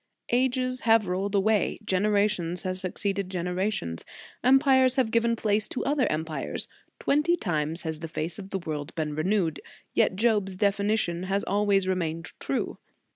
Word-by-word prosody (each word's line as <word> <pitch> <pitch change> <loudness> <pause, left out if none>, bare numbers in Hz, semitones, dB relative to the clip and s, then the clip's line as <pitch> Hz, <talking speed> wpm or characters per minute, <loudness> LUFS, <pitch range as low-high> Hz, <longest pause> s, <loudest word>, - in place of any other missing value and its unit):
Ages 255 +1 +1
have 225 -4 +3
rolled 190 +3 -1
away, 210 +1 +2
gen 190 +2 +1
erations 200 -5 +1
have 185 -1 -2
succeeded 195 +1 -2
generations, 180 - -2 0.4
empires 260 0 +5
have 255 -5 +1
given 230 0 +2
place 215 -1 0
to - - -4
other 280 -1 +2
empires; 155 0 -3 0.3
twenty 300 +5 +2
times 160 - -1
has 160 -2 -3
the 165 - -5
face 160 +3 -4
of 195 -1 -8
the 195 - -2
world 155 -4 -5
been 155 -2 -2
renewed, 165 0 0 0.3
yet - - +3
Job 210 -2 +2
s 190 - -4
definition 200 -3 +1
has 200 +1 +1
always 200 -2 +2
remained 165 -3 -2
true. - - -2
195 Hz, 155 wpm, -27 LUFS, 170-220 Hz, 0.4 s, empires